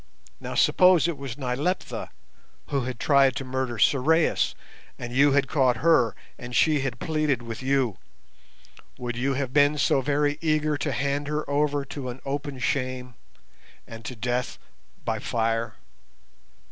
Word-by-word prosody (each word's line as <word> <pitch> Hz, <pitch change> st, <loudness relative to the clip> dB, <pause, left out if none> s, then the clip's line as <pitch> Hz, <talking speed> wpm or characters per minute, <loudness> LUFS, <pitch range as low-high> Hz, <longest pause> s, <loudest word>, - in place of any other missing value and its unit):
Now -, -, -6 dB
suppose 180 Hz, -3 st, +5 dB
it 170 Hz, -, -2 dB
was 135 Hz, -3 st, -7 dB
Nyleptha 140 Hz, +7 st, -2 dB, 0.6 s
who 135 Hz, -3 st, -1 dB
had 125 Hz, -2 st, -5 dB
tried 135 Hz, -3 st, +4 dB
to 135 Hz, -, -4 dB
murder 130 Hz, -2 st, -3 dB
Sorais, 150 Hz, +8 st, +2 dB, 0.4 s
and 120 Hz, 0 st, -6 dB
you 140 Hz, +2 st, +4 dB
had 140 Hz, -1 st, +2 dB
caught 130 Hz, -5 st, +2 dB
her, 125 Hz, -7 st, +3 dB, 0.2 s
and 120 Hz, 0 st, -7 dB
she 155 Hz, +2 st, +4 dB
had 135 Hz, -3 st, -3 dB
pleaded 155 Hz, -6 st, 0 dB
with 115 Hz, 0 st, -6 dB
you, 130 Hz, -6 st, 0 dB, 1.0 s
would 120 Hz, -1 st, -4 dB
you 135 Hz, +3 st, 0 dB
have 130 Hz, -2 st, -3 dB
been 145 Hz, +1 st, +4 dB
so 140 Hz, -1 st, +2 dB
very 145 Hz, +2 st, 0 dB
eager 155 Hz, -1 st, +1 dB
to 145 Hz, 0 st, -2 dB
hand 140 Hz, +3 st, -1 dB
her 150 Hz, +1 st, -2 dB
over 145 Hz, 0 st, 0 dB
to 130 Hz, -1 st, -6 dB
an 125 Hz, +1 st, -7 dB
open 140 Hz, 0 st, -4 dB
shame, 130 Hz, -1 st, -2 dB, 0.7 s
and 115 Hz, 0 st, -10 dB
to 125 Hz, -, -5 dB
death 125 Hz, +2 st, -2 dB, 0.5 s
by -, -, -1 dB
fire? 115 Hz, -1 st, -1 dB
135 Hz, 150 wpm, -25 LUFS, 125-145 Hz, 1.0 s, suppose